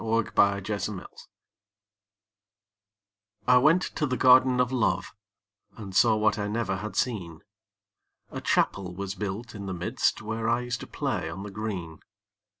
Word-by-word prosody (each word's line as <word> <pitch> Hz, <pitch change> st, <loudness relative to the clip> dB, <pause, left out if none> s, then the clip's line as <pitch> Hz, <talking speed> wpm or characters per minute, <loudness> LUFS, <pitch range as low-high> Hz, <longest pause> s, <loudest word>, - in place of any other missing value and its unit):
THE 115 Hz, 0 st, 0 dB
GARDEN 100 Hz, +1 st, +2 dB
OF 105 Hz, 0 st, -1 dB
LOVE 95 Hz, -3 st, -10 dB, 2.2 s
I 125 Hz, 0 st, +6 dB
went 165 Hz, +8 st, +4 dB
to 150 Hz, -, -2 dB
the 130 Hz, -1 st, -1 dB
Garden 130 Hz, 0 st, +6 dB
of 125 Hz, 0 st, +2 dB
Love, 125 Hz, -4 st, 0 dB, 0.6 s
And 100 Hz, -4 st, -8 dB
saw 110 Hz, +2 st, +5 dB
what 110 Hz, 0 st, +1 dB
I 105 Hz, -, -1 dB
never 105 Hz, -2 st, -1 dB
had 105 Hz, +3 st, -6 dB
seen; 90 Hz, -10 st, -2 dB, 0.9 s
A -, -, -5 dB
Chapel 90 Hz, -2 st, 0 dB
was 100 Hz, 0 st, -4 dB
built 105 Hz, +3 st, -5 dB
in 100 Hz, -2 st, -7 dB
the 95 Hz, -, -3 dB
midst, 85 Hz, +1 st, 0 dB
Where 115 Hz, +1 st, -2 dB
I 120 Hz, +1 st, +2 dB
used 125 Hz, -1 st, -3 dB
to -, -, -8 dB
play -, -, -2 dB
on 100 Hz, -, -7 dB
the 100 Hz, -, -7 dB
green. 95 Hz, -7 st, -5 dB
110 Hz, 155 wpm, -27 LUFS, 95-120 Hz, 2.2 s, I